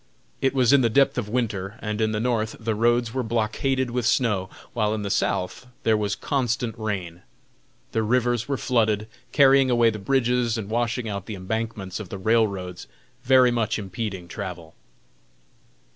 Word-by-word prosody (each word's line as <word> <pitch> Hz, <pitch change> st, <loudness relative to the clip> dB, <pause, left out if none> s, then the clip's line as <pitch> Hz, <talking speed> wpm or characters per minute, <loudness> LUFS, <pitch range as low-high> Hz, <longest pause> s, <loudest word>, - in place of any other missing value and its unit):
It 135 Hz, 0 st, +1 dB
was 125 Hz, -1 st, +4 dB
in 140 Hz, -, +6 dB
the 120 Hz, -, +3 dB
depth 135 Hz, +2 st, +3 dB
of 105 Hz, -3 st, -4 dB
winter, 105 Hz, -4 st, -2 dB
and 105 Hz, 0 st, -3 dB
in 110 Hz, 0 st, +2 dB
the 105 Hz, -, -1 dB
North 110 Hz, -2 st, 0 dB
the 115 Hz, -1 st, -1 dB
roads 120 Hz, +1 st, +2 dB
were 130 Hz, -, 0 dB
blockaded 120 Hz, +3 st, 0 dB
with 120 Hz, -2 st, 0 dB
snow, 105 Hz, -7 st, +1 dB, 0.2 s
while 105 Hz, 0 st, +1 dB
in 105 Hz, -, -4 dB
the 100 Hz, -, -3 dB
South 100 Hz, +4 st, -1 dB, 0.2 s
there 110 Hz, -, +3 dB
was 105 Hz, -2 st, -1 dB
constant 120 Hz, -4 st, -1 dB
rain. 95 Hz, -6 st, -4 dB, 0.7 s
The 110 Hz, -, 0 dB
rivers 120 Hz, +1 st, +1 dB
were 140 Hz, -1 st, -1 dB
flooded, 110 Hz, -5 st, +1 dB, 0.2 s
carrying 135 Hz, -1 st, +5 dB
away 120 Hz, -2 st, +4 dB
the 110 Hz, -, -6 dB
bridges 125 Hz, 0 st, +1 dB
and 105 Hz, -1 st, -5 dB
washing 120 Hz, 0 st, -1 dB
out 100 Hz, -2 st, -5 dB
the 110 Hz, -, -5 dB
embankments 100 Hz, 0 st, -4 dB
of 105 Hz, -5 st, -7 dB
the 100 Hz, -, -5 dB
railroads, 100 Hz, -4 st, 0 dB, 0.4 s
very 130 Hz, -1 st, +5 dB
much 115 Hz, -2 st, 0 dB
impeding 95 Hz, -2 st, -5 dB
travel. 85 Hz, -2 st, -7 dB
110 Hz, 170 wpm, -24 LUFS, 105-120 Hz, 0.7 s, in